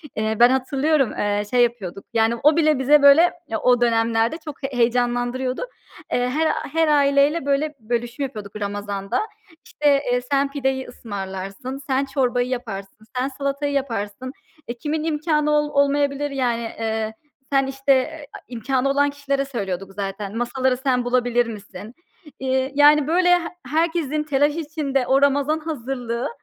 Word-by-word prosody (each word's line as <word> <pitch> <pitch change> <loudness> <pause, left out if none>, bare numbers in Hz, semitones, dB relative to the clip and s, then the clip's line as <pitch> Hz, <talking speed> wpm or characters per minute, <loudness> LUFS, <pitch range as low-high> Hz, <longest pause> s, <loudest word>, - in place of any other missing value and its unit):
Eee, 220 0 -1
ben 240 +1 +8
hatırlıyorum, 270 +2 +1
eee 205 0 0
şey 245 +1 +4
yapıyorduk, 200 -6 -3
yani, 225 +1 +2
o 300 +2 +5
bile 310 -4 +3
bize, 290 +3 +5
böyle, 285 +5 +7
ya, 220 - -2
o 245 -1 +3
dönemlerde 230 +2 +2
çok 295 -2 -8
heyecanlandırıyordu. 245 0 0 0.5
Eee, 245 0 +1
her 315 +5 +1 0.3
her 325 0 +3
aileyle, 285 +1 +3
böyle, 290 +2 0
bölüşüm 240 +4 -3
yapıyorduk 215 -7 -7
Ramazan'da. 200 - -2 0.4
İşte, 285 -2 +2
eee, 245 0 +1
sen 275 0 +2
pideyi 265 -2 -2
ısmarlarsın, 200 +4 -6
sen 270 0 +1
çorbayı 250 -3 0
yaparsın, 215 -4 -6
sen 255 +1 +1
salatayı 280 +1 -3
yaparsın. 255 -2 -3 0.4
E, 235 - -3
kimin 305 +4 -2
imkânı 300 -1 0
ol 295 0 +2
olmayabilir, 285 0 +1
yani. 245 -4 0 0.2
Eee, 220 -1 -2 0.4
sen, 270 -1 +3
işte 270 +1 +2
eee, 295 +3 -3 0.2
imkânı 255 +3 -1
olan 285 +1 +3
kişilere 280 -1 -2
söylüyorduk 195 -7 -5
zaten. 200 +1 -5
Masaları 255 +2 0
sen 255 -2 0
bulabilir 245 -1 +2
misin? 215 0 -9 0.5
Eee, 265 +1 0
yani, 295 0 +6
böyle, 355 +3 +3
he 355 - 0 0.3
herkesin 310 0 0
telaş 290 0 +1
içinde 290 -5 -2
o 270 +2 +3
Ramazan 285 +2 +2
hazırlığı, 255 -5 -4
265 Hz, 145 wpm, -22 LUFS, 235-285 Hz, 0.5 s, ben